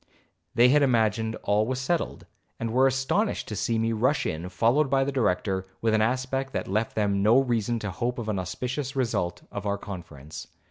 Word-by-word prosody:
They 120 +1 +6
had 145 +3 +5
imagined 110 -3 +2
all 105 +1 +2
was 130 0 -2
settled, 165 +6 -2 0.3
and 115 -1 -3
were 130 +2 +5
astonished 135 - 0
to 105 - -4
see 115 +3 0
me 115 0 +1
rush 125 +7 +1
in, 85 +3 -3
followed 120 - +2
by 135 0 +3
the 140 - -1
Director, 95 -6 0
with 110 +1 +1
an 110 - +3
aspect 130 +3 -1
that - - -2
left 110 +4 -1
them 100 -2 +1
no 110 +5 +5
reason 120 -3 0
to 105 -3 -4
hope 120 +6 -2
of 115 -3 -4
an 105 -3 -1
auspicious 125 - -4
result 115 -9 -1
of 100 0 -5
our 100 0 0
conference. 80 -7 -9
115 Hz, 195 wpm, -26 LUFS, 100-130 Hz, 0.3 s, They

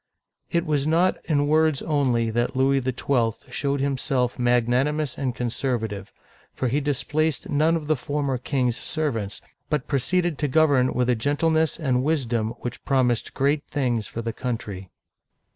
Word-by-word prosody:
It 170 0 0
was 150 -2 0
not 170 +4 +2
in 145 -3 +2
words 155 -1 +2
only 125 -7 +1
that 120 +3 -1
Louis 135 +1 +3
XII. 125 -2 -1
showed 140 -1 -1
himself 130 -3 0
magnanimous 125 +4 +1
and 130 -3 -2
conservative, 115 -5 -2 0.4
for 130 - -1
he 140 +5 +1
displaced 145 +2 -1
none 155 +3 +3
of 160 -2 -3
the 155 +1 +2
former 140 -1 -2
king's 125 -2 0
servants, 120 - -3 0.3
but 150 -4 -1
proceeded 160 +4 0
to 150 - +1
govern 140 -3 +3
with 125 -1 +1
a 125 - +3
gentleness 160 +7 +1
and 130 -5 +1
wisdom 120 -7 0
which 120 - -5
promised 125 -4 +1
great 145 +2 +1
things 120 -7 -1
for 115 - -6
the 115 0 -3
country. 105 -7 -5
135 Hz, 150 wpm, -24 LUFS, 120-150 Hz, 0.4 s, Louis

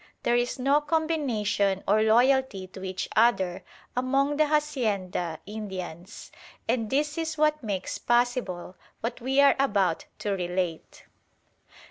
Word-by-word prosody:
There 240 - +2
is 240 +2 0
no 275 +3 +3
combination 270 -11 0
or 210 +2 +4
loyalty 240 -2 +3
to 190 +1 -11
each 185 -1 -3
other 190 -6 +2 0.3
among 275 +3 +1
the 305 0 +4
hacienda 215 - -1
Indians; 190 -3 -7 0.4
and 225 -4 0
this 295 +3 0
is 320 -1 -3
what 305 0 +2
makes 200 -5 -3
possible 240 -7 0 0.3
what 235 +2 -4
we 265 +3 +1
are 280 -1 +6
about 195 -10 +1
to 205 - -3
relate. 180 -3 -3
230 Hz, 125 wpm, -27 LUFS, 190-275 Hz, 0.4 s, are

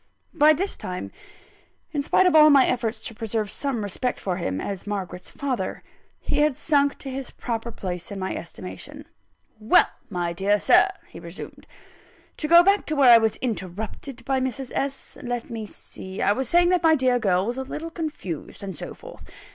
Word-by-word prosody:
By 310 -1 +6
this 385 +6 -2
time 185 -4 -6 0.8
(in 290 - -1
spite 375 +6 +3
of 360 -3 +4
all 305 0 +9
my 275 -3 +7
efforts 235 -2 -1
to 230 - -6
preserve 220 -2 -3
some 270 -6 -1
respect 225 +5 -2
for 185 -2 -2
him, 95 - -2
as 195 - -5
Margaret's 185 -3 -4
father) 255 -9 -3 0.4
he - - -1
had 300 -2 +3
sunk 285 -1 +2
to 270 - -7
his 265 -1 -5
proper 235 -1 -4
place 180 -5 -5
in 200 - -5
my 190 0 -3
estimation. - - -8 0.5
"Well, 215 +1 +5 0.2
my 175 -3 -2
dear 200 +4 +1
Sir," - - +6 0.2
he - - -11
resumed, - - -10 0.7
"to 305 - -2
go 340 +2 +8
back 395 +2 +3
to 310 - -1
where 270 -4 +7
I 230 - +9
was 220 -1 +1
interrupted 220 +4 -5
by 270 -1 +1
Mrs. 260 0 -3
S. 275 0 -4
Let 245 -1 -4
me 220 -2 -5
see: 190 -1 -9
I - - +3
was 255 +3 -1
saying 350 0 +5
that 360 -2 +3
my 320 -1 +5
dear 255 -3 +2
girl 190 -4 +2
was 240 +4 -3
a - - -1
little 310 +5 -6
confused, 300 - -6
and 190 -3 -5
so - - -7
forth. - - -13
245 Hz, 190 wpm, -24 LUFS, 200-285 Hz, 0.8 s, all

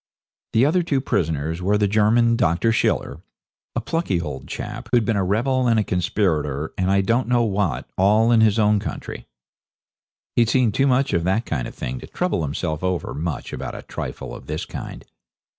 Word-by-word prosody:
The 115 +3 +4
other 170 +5 +3
two 145 -5 0
prisoners 80 - -1
were 100 +3 +2
the 105 -1 +2
German 110 +3 +3
Dr. 115 0 +2
Schiller 110 - 0 0.5
a - - 0
plucky 165 - -1
old 75 -6 -6
chap, - - -6
who'd 120 -3 +3
been 115 - +1
a 100 - +1
rebel 125 +7 +1
and 115 -2 +3
a - - +2
conspirator 80 -6 -1
and 95 0 0
I 100 0 +4
don't 115 +6 +1
know 120 -1 +3
what 100 -5 -1
all 105 +4 +4
in 115 -2 +5
his 110 -1 +4
own 105 -1 +3
country. - - -6 1.1
He'd 115 -2 +3
seen 125 -3 +3
too 135 +7 +2
much 130 +1 +2
of 85 - +1
that 100 +6 +1
kind 65 -7 -2
of - - -11
thing 65 +1 -4
to - - -10
trouble 180 - -1
himself 80 +2 -3
over 90 -1 -1
much 80 0 -4
about - - -5
a - - -8
trifle - - -6
of - - -10
this 75 +1 -3
kind. - - -8
105 Hz, 195 wpm, -22 LUFS, 85-115 Hz, 1.1 s, in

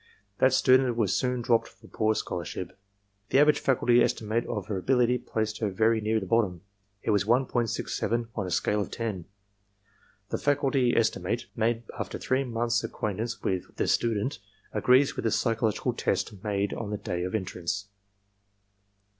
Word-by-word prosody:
That 130 - +5
student 130 -1 +4
was 105 -5 +1
soon 125 -2 0
dropped 115 -1 +2
for - - -19
poor 110 0 0
scholarship. 85 -1 -4 0.5
The - - +3
average 150 +1 +5
faculty 120 -2 +3
estimate 115 0 0
of 105 -5 -3
her 100 -2 -3
ability 125 +3 +2
placed 110 -3 -3
her 110 - 0
very 110 +3 +2
near 110 +1 +1
the 95 - -5
bottom. 95 -4 +1 0.4
It - - +1
was 100 -2 +3
1.67 120 -1 0
on 100 -4 -3
a - - -4
scale 105 +4 +1
of - - -4
ten. 105 -7 -4 1.0
The - - -2
faculty 135 -3 +2
estimate, 110 0 0
made 115 +1 0 0.2
after - - -4
three 130 +1 0
months' 120 -2 0
ac 115 - -4
quaintance 110 +3 -3
with 95 -2 -2
tne - - -1
student, 115 0 0 0.3
agrees 125 +6 +4
with - - -4
the 110 - +2
psychological 115 +2 0
test 100 -2 -2
made 100 -1 -1
on 110 -3 -4
the 105 - -2
day 90 -3 -3
of 90 +3 -2
entrance. 95 0 -3
115 Hz, 165 wpm, -28 LUFS, 105-120 Hz, 1.0 s, That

